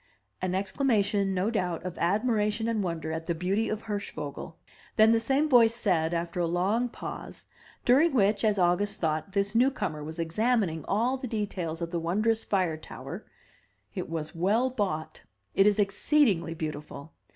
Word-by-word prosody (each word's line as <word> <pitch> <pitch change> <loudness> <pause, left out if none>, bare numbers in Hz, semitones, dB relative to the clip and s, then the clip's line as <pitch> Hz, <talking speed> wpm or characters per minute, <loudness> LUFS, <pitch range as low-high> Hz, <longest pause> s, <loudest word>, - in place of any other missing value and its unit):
An 185 0 -1
exclamation 200 -1 +1
no 190 +5 0
doubt, 180 -6 -2
of 185 -1 -4
admiration 210 +3 +1
and 225 -2 0
wonder 165 -3 -3
at 160 0 -4
the 170 - 0
beauty 195 +6 0
of 215 0 -3
Hirschvogel. 165 -8 -5 0.4
Then 220 +1 +6
the 230 - +4
same 270 +6 +1
voice 235 -5 +5
said, 175 -8 +1
after 170 +1 -2
a 170 - +1
long 200 +8 +1
pause, - - -7 0.4
during 285 +7 +5
which, 210 -4 +2
as 210 -2 +3
August 180 +3 +2
thought, 160 +3 -1
this 200 0 0
new 245 +4 +5
comer 155 - -4
was 160 +2 -7
examining 170 - 0
all 235 +6 +1
the 260 -1 -5
details 185 -7 -3
of 170 - -4
the 170 - -1
wondrous 215 +7 +1
fire 180 -5 0
tower, 155 - -9 0.7
"It - - -5
was 160 -2 -4
well 210 +10 +1
bought; 190 -10 -3 0.3
it 195 - +5
is 210 - +3
exceedingly 200 - +2
beautiful! 150 -1 -6
200 Hz, 165 wpm, -28 LUFS, 170-225 Hz, 0.7 s, Then